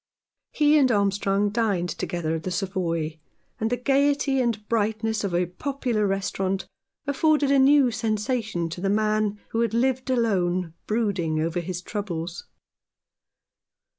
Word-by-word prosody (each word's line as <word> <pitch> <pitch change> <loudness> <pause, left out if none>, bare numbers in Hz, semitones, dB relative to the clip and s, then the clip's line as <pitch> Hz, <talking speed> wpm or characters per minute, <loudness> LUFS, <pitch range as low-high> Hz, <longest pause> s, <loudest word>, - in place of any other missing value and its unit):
He 300 0 +4
and 260 -3 +4
Armstrong 200 -1 +1
dined 205 -6 0
together 170 -3 -3
at 160 - -2
the 185 - -4
Savoy, 170 -4 -2 0.4
and 220 - 0
the 245 - 0
gaiety 275 +1 +2
and 220 -4 -1
brightness 220 0 0
of 190 -3 -1
a 180 +1 +2
popular 235 - -2
restaurant 195 0 -1 0.4
afforded 290 0 +2
a 280 - +5
new 270 -1 +5
sensation 220 -4 -1
to 170 +2 -6
the 195 - 0
man 215 0 +1
who 225 - -2
had 230 -1 0
lived 260 +2 +1
alone, 185 -8 +1
brooding 200 -8 0
over 165 +2 -1
his 180 +1 -5
troubles. 175 -5 -5
210 Hz, 135 wpm, -25 LUFS, 180-245 Hz, 0.4 s, a